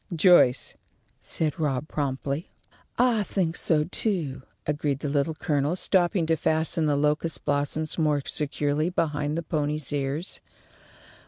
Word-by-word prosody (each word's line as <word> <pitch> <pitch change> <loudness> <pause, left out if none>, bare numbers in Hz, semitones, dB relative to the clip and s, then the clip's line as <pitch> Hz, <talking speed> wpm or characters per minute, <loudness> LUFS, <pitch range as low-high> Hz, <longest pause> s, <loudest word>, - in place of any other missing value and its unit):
"Joyce," 160 -7 +4 0.5
said 160 +2 -2
Rob, 145 -2 -1
promptly. 140 +1 -3 0.5
"I 240 -3 +3
think 180 -4 -1
so, 150 -2 +3
too," 160 - -1 0.2
agreed 145 -2 -1
the 145 - -2
Little 145 +2 0
Colonel, 150 0 0
stooping 180 -1 +1
to 160 0 +2
fasten 160 0 0
the 145 - +2
locust 150 +3 0
blossoms 145 +3 0
more 150 -3 +1
securely 150 +1 0
behind 150 -3 -1
the 170 - -2
pony's 150 -2 -2
ears. 145 +5 -3
150 Hz, 130 wpm, -26 LUFS, 145-165 Hz, 0.5 s, Joyce